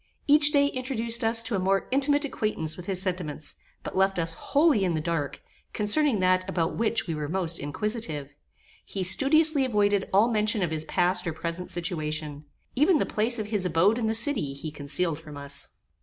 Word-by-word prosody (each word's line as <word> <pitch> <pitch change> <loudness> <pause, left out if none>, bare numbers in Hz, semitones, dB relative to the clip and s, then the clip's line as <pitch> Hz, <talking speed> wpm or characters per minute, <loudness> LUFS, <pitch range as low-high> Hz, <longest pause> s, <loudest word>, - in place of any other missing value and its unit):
Each 295 0 +6
day 285 -2 +4
introduced 245 -4 0
us 225 +1 +3
to 235 - -3
a - - 0
more 195 +1 0
intimate 285 +2 +3
acquaintance 210 - -2
with 180 - -10
his 190 -2 -1
sentiments, 175 -6 -4 0.3
but - - -7
left 195 0 +2
us 165 -1 -1
wholly 280 - +2
in 175 -3 0
the - - -1
dark, 150 -4 -3 0.3
concerning 225 +3 +3
that 185 0 +2
about 165 -1 -1
which 230 0 0
we 165 - -3
were 150 -2 -4
most 175 -2 -2
inquisitive. 150 - -3 0.5
He 195 - -4
studiously 290 - +4
avoided 205 -5 +1
all 205 +4 +4
mention 215 -2 +1
of 170 - -2
his 155 0 -2
past 180 +1 0
or 165 - -2
present 170 +3 -5
situation. 155 -3 -4 0.3
Even 305 +6 +4
the - - 0
place 225 +3 0
of 215 -1 -5
his 210 -3 -1
abode 185 +6 +2
in 225 - -1
the 220 - -1
city 225 - 0
he 155 +2 -7
concealed 150 +2 -2
from 155 -3 -11
us. 140 0 -3
190 Hz, 190 wpm, -26 LUFS, 165-230 Hz, 0.5 s, Each